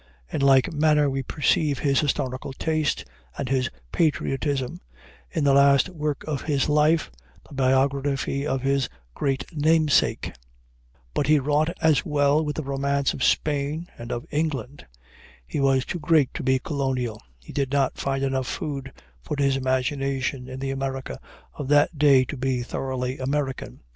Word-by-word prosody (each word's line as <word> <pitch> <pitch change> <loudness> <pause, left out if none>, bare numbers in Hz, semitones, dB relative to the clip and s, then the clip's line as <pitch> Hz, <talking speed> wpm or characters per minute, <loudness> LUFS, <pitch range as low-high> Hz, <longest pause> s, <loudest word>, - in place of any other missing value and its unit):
In - - -1
like 135 +1 +4
manner 150 -1 +3
we 135 0 -1
perceive 145 +1 +1
his 140 -2 +2
historical 135 -2 -2
taste 155 0 -1 0.3
and 140 - -3
his 130 -1 +1 0.2
patriotism 135 - 0 0.5
in 160 - -2
the 140 -1 +4
last 140 +4 +5
work 150 -5 -3
of 150 -3 -3
his 140 -4 0
life, 150 - +3 0.4
the - - -14
biography 135 +1 +1
of 135 -2 -1
his 135 -1 +1 0.2
great 135 - -1
namesake. 155 0 +2 0.8
But 140 - 0
he 155 0 +5
wrought 150 +3 +1
as 160 -3 +4
well 145 0 +2
with 150 -1 -3
the 155 - -3
romance 140 0 0
of 130 - -4
Spain 150 +3 0
and 120 +1 -8
of 120 - -3
England. 145 -4 -3 0.6
He 65 - -4
was 135 -1 +2
too 175 - -4
great 150 -3 +3
to - - -4
be 130 0 +2
colonial; 130 -5 -2 0.2
he - - -13
did 140 -2 -1
not 140 -2 +1
find 135 0 -1
enough 135 -2 -1
food 135 -3 -4 0.3
for 150 - -4
his 140 -1 +2
imagination 135 0 -1
in 130 0 -7
the 135 0 -2
America 135 - -4 0.3
of 145 - -6
that 145 +2 +3
day 140 -3 +6
to 135 - -6
be 130 -1 -1
thoroughly 130 +1 -3
American. 135 - -3
140 Hz, 160 wpm, -24 LUFS, 130-150 Hz, 0.8 s, day